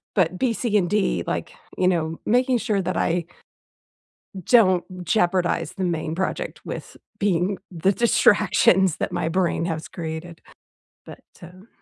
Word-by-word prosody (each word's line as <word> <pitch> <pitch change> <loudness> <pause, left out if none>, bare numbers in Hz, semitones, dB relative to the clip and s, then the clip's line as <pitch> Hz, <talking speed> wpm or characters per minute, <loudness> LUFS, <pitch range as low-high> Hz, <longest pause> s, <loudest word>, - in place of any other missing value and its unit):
but 180 -2 +1
B, 250 -3 +1
C, 225 -1 -2
and 180 -4 +1
D, 210 -1 0
like, - - -3 0.2
you 180 - +2
know, 165 -3 0
making 250 +2 +2
sure 215 -4 0
that 180 - -3
I 170 0 0 1.2
"don't 185 -5 +4 0.2
jeopardize 175 -1 +1
the 190 - -4
main 160 -3 -2
project 190 - -3
with - - -7 0.2
being 195 -1 +1
the 180 +2 +1
distractions 195 -5 +3
that - - -3
my 160 - -1
brain 175 -1 0
has 160 -2 -4
created?" 165 0 -7 0.6
But, - - -12 0.2
um 180 +4 -14
185 Hz, 140 wpm, -23 LUFS, 170-205 Hz, 1.2 s, don't